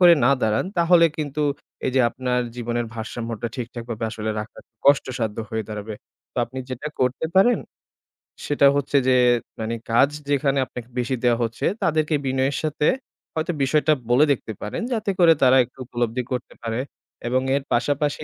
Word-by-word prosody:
করে 175 -2 +8
না 130 - +5
দাঁড়ান 110 +5 +2
তাহলে 170 0 +6
কিন্তু 150 0 -2 0.4
এই - - +1
যে 130 - +5
আপনার 125 -1 -1 0.2
জীবনের 120 0 -2
ভারসাম্যটা 115 0 -4
ঠিক-ঠাকভাবে 120 -2 -5
আসলে 110 -1 -3
রাখা 105 - -9 0.3
কষ্টসাধ্য 125 -6 +2
হয়ে 110 0 -1
দাঁড়াবে। 105 0 -5 0.4
তো - - -38
আপনি 130 +3 -8
যেটা 130 +4 -4
করতে 130 +5 +1
পারেন, 240 +6 +5 0.9
সেটা 140 -1 +4
হচ্ছে 145 0 +1
যে 130 - +5 0.5
মানে 110 +1 -2 0.2
কাজ 135 +5 +5 0.2
যেখানে 140 -1 +2
আপনাকে 125 -1 -9
বেশি 125 +2 0
দেওয়া 120 -1 +4
হচ্ছে 115 0 -3 0.2
তাদেরকে 155 -1 +2
বিনয়ের 130 +1 +1
সাথে 150 -1 -1 0.5
হয়তো 160 +2 -1
বিষয়টা 155 +3 +3 0.2
বলে 130 +5 +5
দেখতে 115 -4 -2
পারেন 105 - -4
যাতে 215 -3 -1
করে 165 -2 +7
তারা 130 +1 +6
একটু 120 - -15
উপলব্ধি 120 0 -1
করতে 125 -1 -4
পারে 115 +1 -2 0.5
এবং 130 +1 +2
এর 140 - -1
পাশাপাশি 145 +4 0
130 Hz, 160 wpm, -23 LUFS, 115-145 Hz, 0.9 s, করে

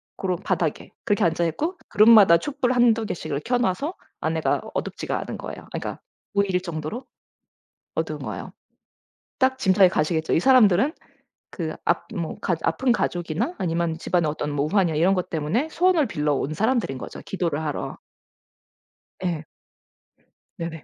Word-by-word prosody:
고런 185 -2 -1
바닥에 170 -6 -1
그렇게 205 - +2
앉아 170 0 +1
있고 315 - -2
그룹마다 210 -5 +7
촛불 260 - -1
1-2 235 -3 +3
개씩을 155 -7 -3
켜놔서 245 - 0 0.3
안에가 - - 0
어둡지가 - - -3
않은 - - -5
거예요. - - -7
아 - - -17
그러니까 - - -3
안 - - -10 0.4
보일 200 -2 +1
정도로 170 - -5 0.9
어두운 - - -2
거예요. - - -6 0.9
딱 260 -1 +3
짐작이 190 -3 +5
가시겠죠? 160 -1 0
이 - - +4
사람들은 250 - +5 0.6
그 160 -4 -4
압 170 - +1
뭐 170 -5 -3
가조 170 -3 -1
아픈 245 +10 +2
가족이나 175 - -1
아니면 170 -3 -1
집안에 175 +1 +1
어떤 150 0 -2
뭐 145 0 0
우환이나 175 -2 +2
이런 175 +5 +4
것 180 -2 -2
때문에 170 - 0
소원을 345 -4 +3
빌려 150 -6 0
온 140 +2 -2
사람들인 220 - 0
거죠 - - -8
기도를 165 -5 -2
하러. 150 -2 -4 1.2
예. 170 -4 -2 1.1
네네. 165 -2 -5
180 Hz, 335 characters per minute, -24 LUFS, 160-230 Hz, 1.2 s, 그룹마다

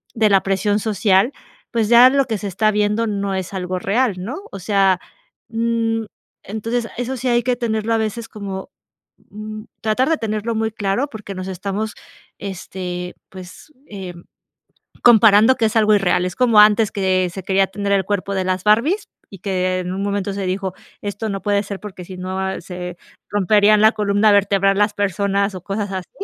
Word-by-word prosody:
de 220 -2 +3
la 195 -1 +4
presión 205 +2 +1
social. 205 +2 +2 0.4
Pues, 225 -3 +1
ya 240 +2 +8
lo 275 0 +2
que 225 -4 -2
se 205 - -5
está 210 +3 +1
viendo 210 +2 +1
no 200 -2 -2
es 190 0 -4
algo 185 -1 -3
real, 215 +3 +1
¿no? 215 +10 -5 0.2
O - - -7
sea, 195 -1 +2 0.5
mm, 225 0 0 0.4
entonces 225 +3 -3
eso 245 +2 -3
sí 255 - -3
hay 240 -1 +2
que 250 0 +1
tenerlo 225 -2 -1
a - - +3
veces 220 +1 -3
como, 195 0 -6 0.6
mm, 215 +1 -7 0.2
tratar 225 +6 +1
de 325 - +2
tenerlo 220 +1 -2
muy 220 0 -1
claro, 205 +5 -1
porque, 210 -5 -8
nos 185 0 -5
estamos, 200 +3 -3 0.5
este, 180 -2 -6
pues, 185 +9 -12 0.2
em, 180 -4 -9 0.8
comparando 225 +1 +6
que 230 - +2
es 220 - -2
algo 215 -1 +5
irreal. 185 -2 +2
Es 180 - -5
como 240 -4 +3
antes, 210 0 +5
que 185 -2 +1
se 190 +1 -7
quería 195 +1 +2
tener 200 +1 -3
el 195 -2 +2
cuerpo 200 -1 -2
de 190 -1 -1
las 185 0 -1
Barbies 245 - +3 0.3
y 195 - -12
que 185 -1 -1
en 180 0 -4
un 195 - -3
momento 200 0 -2
se 195 -1 -3
dijo: 190 0 -2 0.3
"Esto 205 +2 -4
no 195 -2 -4
puede 205 -1 +1
ser 200 -1 -6
porque, 190 -4 -9
si 185 +1 -9
no 190 +1 -3
se 180 0 -7 0.3
romperían 205 +1 +4
la 220 +2 +6
columna 205 0 +2
vertebral 195 -1 +3
las 210 0 +2
personas", 200 0 0
o 185 - -6
cosas 200 +1 -3
así, 185 -1 -5
205 Hz, 185 wpm, -20 LUFS, 190-220 Hz, 0.8 s, ya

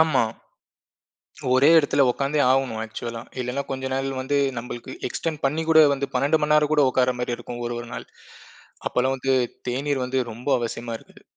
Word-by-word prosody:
ஆமா. 155 -6 +4 1.3
ஒரே 135 +4 +5
இடத்துல 145 -2 +3
உக்காந்தே 140 +4 0
ஆவணும் 130 -4 +1
ஆக்சுவலா. 115 +1 -6 0.2
இல்லன்னா, 125 +3 -2
கொஞ்ச 130 0 -3
நாள் 135 0 -1
வந்து 140 +2 -1 0.2
நம்பளுக்கு 120 0 -7 0.2
எக்ஸ்டென்ட் 160 +1 -4
பண்ணிக் 160 +4 0
கூட 160 0 +8
வந்து 140 0 -3
12 145 +5 +2
மணி 150 0 +2
நேரம் 150 0 +3
கூட 150 -2 +5
உட்காரமாரி 125 -1 0
இருக்கும் 120 0 -7
ஒரு 120 0 -3
ஒரு 120 - -9
நாள். - - -7 0.8
அப்பல்லாம் 130 +2 +1
வந்து, 135 0 +1 0.3
தேநீர் 135 +1 -1
வந்து 130 +1 -1
ரொம்ப 120 +5 -8
அவசியமா 115 0 -4
இருக்குது. - - -20
130 Hz, 165 wpm, -24 LUFS, 125-145 Hz, 1.3 s, கூட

